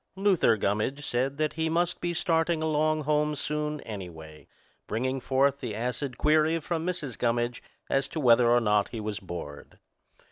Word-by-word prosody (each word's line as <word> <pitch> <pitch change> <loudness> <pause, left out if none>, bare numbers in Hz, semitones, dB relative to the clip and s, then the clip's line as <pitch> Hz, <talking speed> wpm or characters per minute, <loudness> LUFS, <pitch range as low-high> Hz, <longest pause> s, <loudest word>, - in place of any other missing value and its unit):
Luther 190 - +3
Gummidge 110 +9 -1
said 130 +3 -1
that 155 0 0
he 160 0 -1
must 175 +2 0
be 175 - -1
starting 165 -1 +1
along 155 0 +1
home 150 +1 +1
soon, 150 +1 -2
anyway, 80 -7 -9 0.4
bringing 130 +4 -1
forth 135 +2 +2
the 115 -5 -4
acid 125 +3 -3
query 155 +2 +3
from 165 0 -3
Mrs. 150 -9 -4
Gummidge 120 0 0 0.3
as 135 0 +1
to 155 - -5
whether 120 -3 +5
or 120 0 +4
not 105 -2 +2
he 115 - -6
was 105 -1 -4
bored. 85 -6 -8
135 Hz, 165 wpm, -28 LUFS, 115-155 Hz, 0.4 s, whether